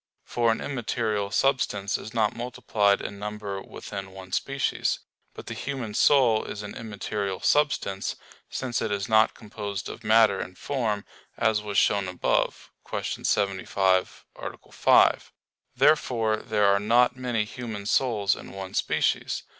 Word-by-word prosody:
For 120 Hz, -1 st, +2 dB
an 115 Hz, -, -2 dB
immaterial 110 Hz, -6 st, -1 dB
substance 105 Hz, -5 st, +1 dB
is 110 Hz, -, -5 dB
not 110 Hz, -2 st, +1 dB
multiplied 110 Hz, -4 st, +1 dB
in 100 Hz, -, -6 dB
number 105 Hz, -1 st, -5 dB
within 95 Hz, -1 st, -7 dB
one 95 Hz, -1 st, -11 dB
species. 135 Hz, +6 st, 0 dB, 0.4 s
But -, -, -9 dB
the -, -, -5 dB
human 130 Hz, -6 st, -4 dB
soul 120 Hz, -3 st, +4 dB
is 105 Hz, -, -6 dB
an 105 Hz, -, -7 dB
immaterial 105 Hz, -3 st, -4 dB
substance; 145 Hz, -10 st, +1 dB, 0.3 s
since 125 Hz, -3 st, -2 dB
it 110 Hz, -, -1 dB
is 100 Hz, -1 st, -1 dB
not 110 Hz, 0 st, +4 dB
composed 105 Hz, -2 st, -6 dB
of 115 Hz, -, -9 dB
matter 110 Hz, -2 st, +5 dB
and 90 Hz, 0 st, -6 dB
form 110 Hz, -7 st, -2 dB, 0.3 s
as 110 Hz, -1 st, +2 dB
was 105 Hz, -2 st, -3 dB
shown 100 Hz, -2 st, +3 dB
above 90 Hz, -1 st, -1 dB
(Q. -, -, -4 dB
75, 95 Hz, -2 st, +1 dB
A. -, -, -9 dB
5). -, -, +4 dB, 0.4 s
Therefore 120 Hz, -5 st, +3 dB
there 105 Hz, -1 st, 0 dB
are 100 Hz, 0 st, +4 dB
not 120 Hz, +4 st, +3 dB
many 125 Hz, -4 st, -1 dB
human 110 Hz, -3 st, -6 dB
souls 105 Hz, -4 st, +2 dB
in -, -, -11 dB
one 95 Hz, -1 st, -7 dB
species. -, -, 0 dB
105 Hz, 145 wpm, -26 LUFS, 100-120 Hz, 0.4 s, matter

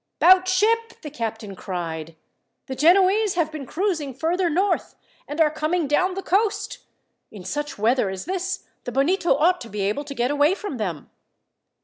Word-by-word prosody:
"'Bout 370 Hz, 0 st, +6 dB
ship," 455 Hz, +5 st, +1 dB
the 300 Hz, -, -7 dB
captain 225 Hz, -6 st, -5 dB
cried. 165 Hz, -4 st, -5 dB, 0.5 s
"The 265 Hz, -, -5 dB
Genoese 375 Hz, +8 st, +4 dB
have 325 Hz, -3 st, 0 dB
been 295 Hz, -4 st, -7 dB
cruising 320 Hz, -, -2 dB
further 345 Hz, +6 st, 0 dB
north, 375 Hz, +6 st, 0 dB, 0.3 s
and 295 Hz, +2 st, -6 dB
are 310 Hz, -2 st, +4 dB
coming 310 Hz, +2 st, -1 dB
down 365 Hz, +6 st, +1 dB
the 390 Hz, -, -4 dB
coast. 415 Hz, +3 st, 0 dB, 0.5 s
In 205 Hz, -4 st, -11 dB
such 295 Hz, +10 st, -4 dB
weather 220 Hz, 0 st, +2 dB
as 190 Hz, -1 st, -6 dB
this, 380 Hz, +2 st, -3 dB, 0.2 s
the 245 Hz, -, -4 dB
Bonito 330 Hz, +5 st, +2 dB
ought 350 Hz, +5 st, +2 dB
to 230 Hz, -, -8 dB
be 205 Hz, 0 st, -4 dB
able 205 Hz, +9 st, -1 dB
to 280 Hz, -1 st, -7 dB
get 245 Hz, +2 st, 0 dB
away 290 Hz, +5 st, +3 dB
from 405 Hz, -10 st, -6 dB
them." 180 Hz, -9 st, -4 dB
305 Hz, 170 wpm, -23 LUFS, 235-370 Hz, 0.5 s, Bout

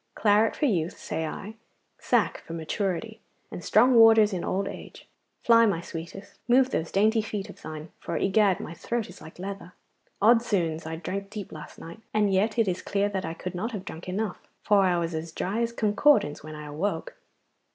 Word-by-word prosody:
Claret 210 Hz, +1 st, +3 dB
for 300 Hz, -, 0 dB
youth, 175 Hz, -, 0 dB
say 160 Hz, 0 st, -3 dB
I, 200 Hz, +7 st, -7 dB, 0.5 s
sack -, -, +1 dB
for 165 Hz, -, -10 dB
maturity, 190 Hz, +6 st, -3 dB, 0.3 s
and 175 Hz, -, -7 dB
strong 245 Hz, +5 st, +5 dB
waters 225 Hz, -2 st, +7 dB
in 180 Hz, -, -2 dB
old 195 Hz, +1 st, -1 dB
age. -, -, -9 dB, 0.4 s
Fly, 230 Hz, -1 st, +6 dB
my 195 Hz, -5 st, 0 dB
sweetest, 170 Hz, +3 st, -9 dB
move 255 Hz, +2 st, +4 dB
those 160 Hz, -, -2 dB
dainty 220 Hz, +3 st, +3 dB
feet 210 Hz, -1 st, -5 dB
of -, -, -17 dB
thine, 155 Hz, 0 st, -7 dB
for 170 Hz, -, -4 dB
egad! 195 Hz, -1 st, +3 dB
my 165 Hz, -, -6 dB
throat 235 Hz, +5 st, -3 dB
is -, -, -13 dB
like 160 Hz, -, -12 dB
leather. 190 Hz, -1 st, -7 dB, 0.5 s
Od's 230 Hz, +3 st, +4 dB
'oons, 165 Hz, -4 st, 0 dB
I 160 Hz, -, -4 dB
drank 195 Hz, +4 st, -5 dB
deep 210 Hz, -2 st, -7 dB
last 150 Hz, -1 st, -10 dB
night, 165 Hz, +7 st, -10 dB, 0.2 s
and 210 Hz, -2 st, +3 dB
yet 210 Hz, +4 st, +1 dB
it 225 Hz, -3 st, +3 dB
is 185 Hz, -1 st, -1 dB
clear 200 Hz, 0 st, 0 dB
that 190 Hz, -2 st, -3 dB
I 165 Hz, 0 st, -4 dB
could 185 Hz, -, -6 dB
not 220 Hz, +7 st, -3 dB
have 195 Hz, -3 st, -5 dB
drunk 175 Hz, -1 st, -8 dB
enough, 200 Hz, +1 st, -2 dB, 0.2 s
for 205 Hz, -1 st, +4 dB
I 180 Hz, -2 st, +3 dB
was 170 Hz, 0 st, -2 dB
as 160 Hz, +1 st, -4 dB
dry 195 Hz, +7 st, -2 dB
as 235 Hz, -, +1 dB
a 235 Hz, -, -15 dB
concordance 210 Hz, -, +3 dB
when 155 Hz, 0 st, -8 dB
I 150 Hz, 0 st, -8 dB
awoke. 190 Hz, -, -3 dB
195 Hz, 205 wpm, -27 LUFS, 170-220 Hz, 0.5 s, waters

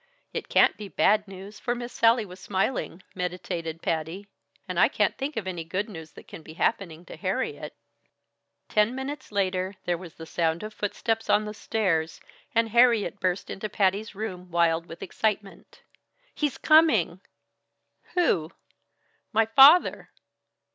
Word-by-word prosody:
"It -, -, -5 dB
can't -, -, +4 dB
be 210 Hz, -, -7 dB
bad 210 Hz, +2 st, +2 dB
news, 195 Hz, +2 st, -10 dB
for 240 Hz, -, -2 dB
Miss 240 Hz, 0 st, -7 dB
Sallie 230 Hz, 0 st, +3 dB
was 180 Hz, -1 st, -12 dB
smiling 190 Hz, -1 st, -2 dB
" -, -, -33 dB
meditated 175 Hz, -2 st, -4 dB
Patty. 165 Hz, +5 st, -2 dB, 0.4 s
"And -, -, -2 dB
I -, -, +7 dB
can't -, -, 0 dB
think 280 Hz, +1 st, -4 dB
of 215 Hz, -, -2 dB
any 175 Hz, -3 st, -4 dB
good 190 Hz, +6 st, -3 dB
news 160 Hz, -7 st, -10 dB
that -, -, -14 dB
can -, -, -10 dB
be 155 Hz, 0 st, -12 dB
happening 170 Hz, -2 st, -2 dB
to -, -, -10 dB
Harriet." -, -, -3 dB, 0.9 s
Ten 210 Hz, +3 st, +2 dB
minutes 265 Hz, 0 st, -6 dB
later 190 Hz, -1 st, -1 dB
there 175 Hz, -1 st, -1 dB
was 175 Hz, -3 st, -11 dB
the 160 Hz, -, -9 dB
sound 165 Hz, +1 st, -1 dB
of 215 Hz, 0 st, -7 dB
footsteps 225 Hz, +2 st, -2 dB
on 215 Hz, -, +3 dB
the 210 Hz, -, -5 dB
stairs, 185 Hz, -7 st, -1 dB, 0.4 s
and 230 Hz, 0 st, +3 dB
Harriet 235 Hz, -3 st, +3 dB
burst 185 Hz, -1 st, -1 dB
into 215 Hz, +2 st, -5 dB
Patty's 200 Hz, +2 st, 0 dB
room 185 Hz, -4 st, -6 dB
wild 170 Hz, -1 st, +1 dB
with 165 Hz, -, -9 dB
excitement. 205 Hz, 0 st, -3 dB, 0.5 s
"He's 295 Hz, -3 st, -1 dB
coming!" 315 Hz, +1 st, +4 dB, 0.9 s
"Who?" 170 Hz, -, +2 dB, 0.8 s
"My 225 Hz, -1 st, +3 dB
father." 275 Hz, +10 st, +6 dB
200 Hz, 155 wpm, -26 LUFS, 175-225 Hz, 0.9 s, I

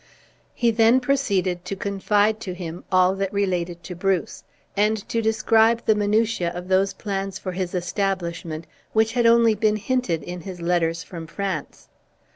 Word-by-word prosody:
He 235 Hz, -1 st, +2 dB
then 225 Hz, +3 st, +5 dB
proceeded 200 Hz, -10 st, 0 dB
to 195 Hz, -, -3 dB
confide 205 Hz, +2 st, +1 dB
to 185 Hz, -5 st, -5 dB
him 175 Hz, -1 st, -7 dB
all 185 Hz, 0 st, +4 dB
that 195 Hz, -1 st, -1 dB
related 180 Hz, -4 st, -1 dB
to 180 Hz, -, -7 dB
Bruce; 190 Hz, 0 st, -1 dB, 0.3 s
and 210 Hz, +2 st, +2 dB
to 230 Hz, -, 0 dB
describe 225 Hz, +1 st, +3 dB
the 220 Hz, -, +5 dB
minutiae 210 Hz, -2 st, +1 dB
of 175 Hz, +1 st, -7 dB
those 190 Hz, +1 st, +3 dB
plans 195 Hz, -1 st, -4 dB
for 185 Hz, -, -5 dB
his 185 Hz, 0 st, -3 dB
establishment, 175 Hz, -3 st, -2 dB, 0.3 s
which 220 Hz, 0 st, +2 dB
had 240 Hz, -2 st, +3 dB
only 230 Hz, -1 st, +5 dB
been 215 Hz, 0 st, +1 dB
hinted 215 Hz, -, -1 dB
in 175 Hz, +3 st, -6 dB
his 185 Hz, 0 st, -8 dB
letters 170 Hz, -1 st, 0 dB
from 165 Hz, -2 st, -8 dB
France. 185 Hz, -3 st, -5 dB
195 Hz, 160 wpm, -23 LUFS, 180-220 Hz, 0.3 s, then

